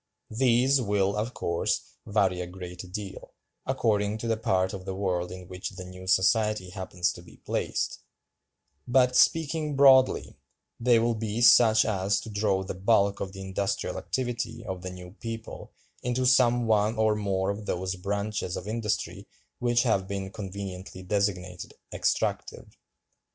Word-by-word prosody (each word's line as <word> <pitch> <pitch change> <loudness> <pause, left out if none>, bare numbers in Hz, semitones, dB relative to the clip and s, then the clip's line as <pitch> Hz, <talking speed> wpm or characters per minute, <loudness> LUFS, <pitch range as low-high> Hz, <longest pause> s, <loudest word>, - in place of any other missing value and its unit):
These 130 +3 +3
will, 100 -3 +1
of 110 +4 -3
course, 85 0 -1 0.2
vary 95 -4 +1
a 90 - -4
good 90 0 -9
deal, 100 0 -7 0.3
according 105 -1 +1
to 115 - -5
the 115 - +2
part 95 -4 0
of 95 -2 -6
the 95 -1 -4
world 90 -2 -1
in 90 -1 -9
which 90 0 -5
the 95 -2 -9
new 90 0 -10
society 105 0 +2
happens 90 -1 -2
to - - -11
be 85 - -16
placed; - - -2 0.9
but, 125 0 +3
speaking 155 -1 +2
broadly, 135 -2 +5 0.4
they 120 0 +4
will 115 +1 +2
be 110 0 -3
such 110 -2 +6
as 100 -1 +1
to 110 - -8
draw 100 -2 +1
the 95 - -5
bulk 100 +1 +2
of 95 -1 -5
the 95 - -8
industrial 95 +1 -2
activity 120 -2 -3
of 95 -3 -5
the 90 - -5
new 90 -1 -10
people 115 -1 -7 0.3
into 125 +1 -1
some 120 -2 +4
one 110 0 +2
or 110 -1 +3
more 100 -2 0
of 105 +1 -7
those 95 +1 -2
branches 100 0 -3
of 90 - -7
industry 110 -1 -3 0.3
which 120 0 +2
have 100 -6 +1
been 95 -1 -4
conveniently 95 -2 -7
designated 90 -2 -2 0.2
'extractive. - - -2
100 Hz, 155 wpm, -27 LUFS, 95-115 Hz, 0.9 s, such